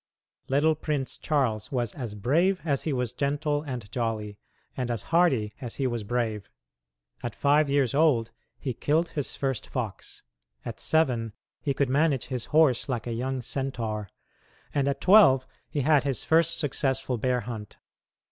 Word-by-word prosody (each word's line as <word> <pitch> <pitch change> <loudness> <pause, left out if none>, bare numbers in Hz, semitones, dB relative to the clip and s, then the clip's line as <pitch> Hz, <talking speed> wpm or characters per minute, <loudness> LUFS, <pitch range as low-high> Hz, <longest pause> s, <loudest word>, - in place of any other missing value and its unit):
Little 145 +4 +3
Prince 150 -3 -2
Charles 130 -7 0
was 120 -5 -1
as 120 -6 -6
brave 170 - +2
as 140 -4 +1
he 160 - -2
was 125 -3 -1
gentle 145 +2 0
and 125 -8 -6
jolly, 110 -4 -3 0.4
and 125 -2 -2
as 115 -4 -2
hardy 130 -12 +3
as 120 -3 -5
he 135 - -1
was 120 -3 -1
brave. 110 -2 -2 0.7
At 120 -3 -5
five 145 +1 +3
years 140 -4 +2
old 140 -7 +3 0.3
he 130 -4 -3
killed 160 +8 +1
his 145 -4 -3
first 135 -4 -2
fox; 110 -7 -5 0.4
at 115 -2 -6
seven 125 -9 +1 0.3
he 140 -2 -1
could 140 - +2
manage 140 -2 +2
his 125 -4 -2
horse 150 -4 +3
like 120 -3 -2
a 120 - -3
young 130 +2 -2
centaur; 115 -6 -3 0.6
and 140 -1 +1
at 140 - -1
twelve 175 -11 +6 0.2
he 145 - -1
had 145 0 +4
his 135 -4 -1
first 165 +1 +3
successful 135 -3 -1
bear 125 +1 +1
hunt. 110 -2 -7
130 Hz, 160 wpm, -27 LUFS, 115-145 Hz, 0.7 s, twelve